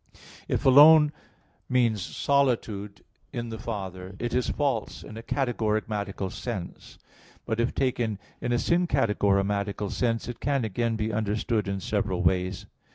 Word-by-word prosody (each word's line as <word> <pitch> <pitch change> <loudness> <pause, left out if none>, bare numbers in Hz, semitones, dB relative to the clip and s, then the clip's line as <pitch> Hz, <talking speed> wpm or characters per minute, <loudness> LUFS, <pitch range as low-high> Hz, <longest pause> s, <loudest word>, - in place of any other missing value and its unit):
If - - -1
"alone" 150 +3 +8 0.6
means 120 -5 +2
solitude 115 -6 0 0.3
in 120 0 -4
the 110 -1 -6
Father, 95 -4 -6
it 120 +3 -3
is 125 0 +1
false 135 -7 -1
in 110 - -10
a 115 - -6
categorematical 110 -6 -1
sense; 105 -8 -6 0.5
but 110 -1 -2
if 115 +2 0
taken 120 -5 0 0.2
in 120 - -2
a - - +3
syncategorematical 105 - +1
sense 115 -2 -1
it 120 - -6
can 140 -3 0
again 115 +2 -1
be 110 0 -2
understood 110 0 0
in 100 -1 -2
several 95 -4 -1
ways. 90 +2 0
110 Hz, 135 wpm, -27 LUFS, 100-120 Hz, 0.6 s, alone